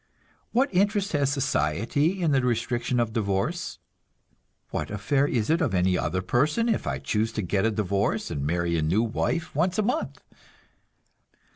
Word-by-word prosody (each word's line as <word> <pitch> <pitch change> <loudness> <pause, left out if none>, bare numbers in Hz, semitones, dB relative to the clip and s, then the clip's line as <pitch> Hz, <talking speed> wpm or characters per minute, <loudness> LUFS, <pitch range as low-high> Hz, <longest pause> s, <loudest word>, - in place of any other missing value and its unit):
What 260 0 +1
interest 200 +1 +2
has 140 -3 +1
society 140 - 0
in 160 - +2
the 135 -2 +3
restriction 120 0 0
of 115 -2 0
divorce? 105 - -1 0.9
What - - -3
affair 135 +8 +1
is 115 -2 0
it 165 +2 +2
of 125 -12 +1
any 90 0 +2
other 95 +1 -1
person 150 - +1
if - - 0
I 65 - -1
choose 105 +11 -1
to 110 - -2
get 95 +3 0
a - - +2
divorce 100 -1 -1
and 70 - -3
marry 85 +3 0
a - - 0
new 90 +9 +2
wife 165 +8 -2
once 175 +5 +1
a 215 - +2
month? 250 +9 -2
120 Hz, 165 wpm, -26 LUFS, 95-160 Hz, 0.9 s, the